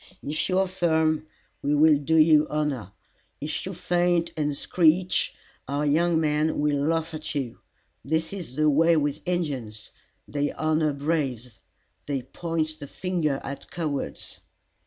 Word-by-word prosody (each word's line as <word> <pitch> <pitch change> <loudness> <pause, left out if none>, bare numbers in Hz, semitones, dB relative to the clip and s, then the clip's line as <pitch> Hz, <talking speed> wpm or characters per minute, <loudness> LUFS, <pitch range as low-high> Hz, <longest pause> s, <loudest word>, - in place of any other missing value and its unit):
If 150 +5 -2
you 185 - +2
are 190 - +4
firm, 160 -4 +1 0.3
we 145 +1 +1
will 150 0 +5
do 160 +3 0
you 155 -1 +6
honor; 145 -10 -2 0.5
if 150 +5 -4
you 190 - -4
faint 175 -1 +1
and 150 -2 -1
screech, 175 +1 +2 0.3
our 145 +2 -1
young 165 +3 +3
men 155 0 +1
will 145 -1 +1
laugh 165 0 0
at 155 -1 -5
you. 130 -5 -3 0.4
This 160 +4 -1
is 175 -10 -7
the 155 +1 +2
way 165 +3 +4
with 145 0 -1
Injins. 135 -12 -3 0.4
They 145 0 -1
honor 155 -1 +1
braves; 140 -6 -2 0.5
they 140 -3 -2
point 160 -1 -3
the 145 - -7
finger 160 -5 -1
at 140 +1 -7
cowards." 155 -5 -4
155 Hz, 145 wpm, -26 LUFS, 145-165 Hz, 0.5 s, you